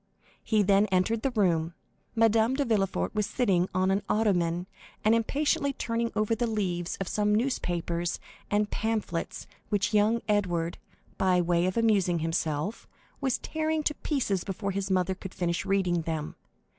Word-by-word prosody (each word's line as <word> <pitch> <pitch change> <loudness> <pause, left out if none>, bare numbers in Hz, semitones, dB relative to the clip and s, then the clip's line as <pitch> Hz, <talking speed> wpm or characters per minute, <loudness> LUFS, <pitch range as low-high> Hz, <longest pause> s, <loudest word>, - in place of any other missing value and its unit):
He 215 -2 +2
then 200 +1 +4
entered 190 +4 +1
the 270 - +1
room. 175 -8 +1 0.4
Madame 225 +2 +3
de 285 0 0
Villefort 195 - 0
was 210 -1 0
sitting 195 -7 +1
on 185 +1 +1
an 195 +1 +1
ottoman 180 -5 +1 0.4
and 215 - +5
impatiently 280 +4 +1
turning 230 -2 -2
over 215 +1 +1
the 235 +1 0
leaves 180 -5 -2
of 195 - -3
some 210 +1 +1
newspapers 175 -8 -1 0.3
and 205 0 +1
pamphlets 215 -6 -2 0.2
which 205 +1 0
young 215 +2 +3
Edward, 175 -5 0 0.4
by 185 -1 +3
way 175 0 +2
of 185 - -2
amusing 200 -6 +3
himself, 165 +3 -2 0.3
was 265 -3 0
tearing 315 0 -2
to 300 - +1
pieces 245 - -1
before 200 +1 -3
his 195 0 -3
mother 185 0 +1
could 185 0 -9
finish 170 -2 -1
reading 180 -3 +1
them. 160 -2 -4
200 Hz, 155 wpm, -28 LUFS, 175-225 Hz, 0.4 s, and